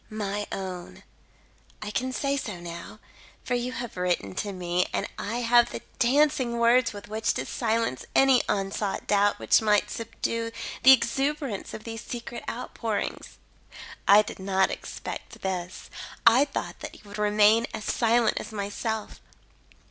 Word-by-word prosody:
"My 205 -1 -3
Own: 185 -2 -6 0.8
"I 210 0 -5
can 255 +4 -1
say 275 +2 0
so 210 -9 -4
now; 170 0 -8 0.5
for - - -2
you 245 +1 -1
have 240 -2 -5
written 175 - -1
to 205 - -3
me, 180 -1 0
and - - -1
I 230 +4 -2
have 240 0 +5
the - - -6 0.2
dancing 260 -1 +3
words 235 +1 +4
with 205 0 -9
which 220 +1 -1
to - - -2
silence 225 - -1
any 270 -2 +6
unsought 195 0 -1
doubt 205 0 +3
which - - +4
might 210 -1 +2
subdue 230 0 -3 0.3
the 265 - +9
exuberance 270 -1 +1
of 215 - -9
these 225 -1 -6
secret 240 0 -6
outpourings. 230 -3 -4 0.7
"I 205 +2 +8
did 205 - -8
not 190 0 +2
expect - - -7
this. 185 -1 -4 0.3
I 240 +5 +7
thought 280 - -5
that - - -7
you - - -15
would 205 +1 -8
remain 210 +2 +4
as 215 -1 -6
silent 235 -1 +2
as - - -7
myself. 215 +1 -4
220 Hz, 150 wpm, -27 LUFS, 200-240 Hz, 0.8 s, the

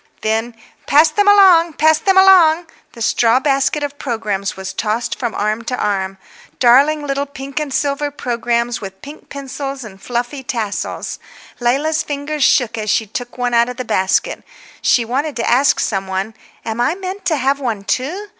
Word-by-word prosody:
Then, 225 +2 -1 0.3
"Pass 305 +3 +5
them 410 +6 +1
along, 370 -5 +6
pass 315 +1 +3
them 385 -1 +2
along!" 355 -3 +6 0.3
The 230 - -5
straw 235 +2 +3
basket 275 +1 0
of 285 0 -5
programmes 210 -7 -3
was 190 0 -6
tossed 220 +2 -2
from 240 -4 -3
arm 215 +2 -1
to 250 +1 -3
arm. 195 -2 -2 0.4
Darling 280 +5 +4
little 280 0 -2
pink 275 0 -6
and 300 -2 -4
silver 285 +2 -1
programmes, 240 -3 -2
with 190 -1 -9
pink 290 +2 -12
pencils 275 -1 -6
and 195 -3 -12
fluffy 245 +3 -3
tassels. 230 -5 -4 0.4
Leila's 280 +6 +1
fingers 290 0 -3
shook 230 -4 +2
as 215 0 -3
she 220 - +2
took 245 +4 -7
one 245 -1 -1
out 235 +1 +3
of 250 - -7
the 255 - -4
basket. 190 0 0 0.4
She 235 - +3
wanted 275 +6 -2
to 235 - -2
ask 265 +4 +3
some 195 -2 -1
one, 190 +3 -3 0.3
"Am 225 +1 -3
I 305 - +1
meant 380 +1 -6
to 335 -3 +2
have 275 0 0
one 230 -7 -3
too?" 330 - -3
255 Hz, 175 wpm, -17 LUFS, 230-295 Hz, 0.4 s, along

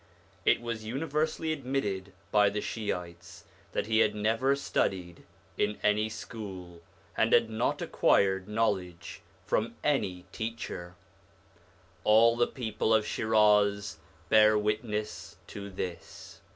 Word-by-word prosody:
It - - +4
was 115 -2 -4
universally 155 +6 -1
admitted 125 -9 -3 0.2
by 105 -1 +5
the 105 +1 -3
Shiites 90 -6 -5 0.3
that - - -1
he 110 0 +2
had 110 -2 +3
never 115 +6 +2
studied 90 -10 -2 0.3
in 105 0 +1
any 105 +1 +2
school, 95 -7 -8 0.3
and - - +2
had 110 - +4
not 110 +2 -1
acquired 95 -1 +2
knowledge 100 -6 -2 0.2
from - - 0
any 90 -1 0
teacher; 110 -6 -5 1.1
all 115 +2 +5
the 120 0 +2
people 110 -2 0
of 110 -1 +2
Shiraz 105 -4 +2 0.3
bear 110 +1 +6
witness 105 0 -3
to 100 0 -8
this. 90 -2 -7
105 Hz, 115 wpm, -29 LUFS, 95-115 Hz, 1.1 s, bear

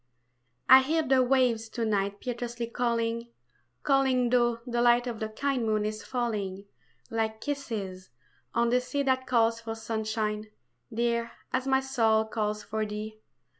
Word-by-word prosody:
I 260 +1 +10
HEAR 315 +4 +1
the 265 -2 +4
waves 250 -3 +2
to 230 0 -2
night 200 -1 0
Piteously 240 -1 -4
calling, 235 -1 -1 0.6
calling 265 -3 +3
Though 240 -2 +3
the 240 -1 -1
light 240 0 +4
Of 235 -3 -4
the 220 - -3
kind 265 +3 -1
moon 215 -1 +1
is 215 0 -4
falling, 205 -6 -3 0.5
Like 220 -1 -1
kisses, 220 - -4 0.5
on 235 0 +2
the 250 +1 +3
sea 280 +3 -2
That 260 -1 +1
calls 230 -2 +2
for 225 -1 -5
sunshine, 220 -1 -2 0.4
dear, 235 0 0 0.2
as 255 +1 0
my 265 0 +3
soul 225 -5 +2
calls 210 -1 -2
for 220 0 -2
thee. 215 +1 -5
235 Hz, 150 wpm, -28 LUFS, 220-250 Hz, 0.6 s, I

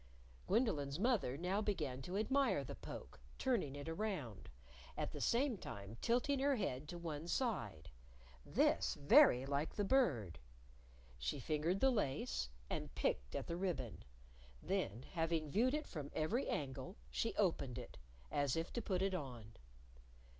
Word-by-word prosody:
Gwendolyn's 170 - +1
mother 200 - +2
now 185 +5 0
began 150 -11 -1
to 180 +8 -3
admire 270 +6 +2
the - - -6
poke, - - -8 0.2
turning 220 - +1
it 145 +1 -6
around, 165 - -3 0.5
at - - -1
the - - -6
same 245 -3 +2
time 100 +2 -7
tilting 250 +4 +2
her 280 +1 +3
head 150 - -2
to 175 - -5
one 165 -2 -4
side, 105 - -1 0.5
this - - +2
very 135 -3 +7
like 140 +3 -1
the 205 - +1
Bird! 130 - +2 0.8
She 65 - -1
fingered 155 +7 0
the 265 - +6
lace, 100 - 0 0.2
and - - -4
picked 65 0 0
at - - -2
the 170 - -3
ribbon. 130 - -2 0.6
Then, 115 +6 -1
having 165 -3 0
viewed 250 - +3
it 305 0 -2
from 145 -4 -6
every 215 - +1
angle, 135 - -3
she 60 +1 -1
opened - - +1
it - - -8 0.3
as 145 -3 +1
if 165 +1 -2
to 235 - -1
put 190 -3 0
it 195 -1 +1
on. 125 - -5
165 Hz, 150 wpm, -39 LUFS, 130-215 Hz, 0.8 s, very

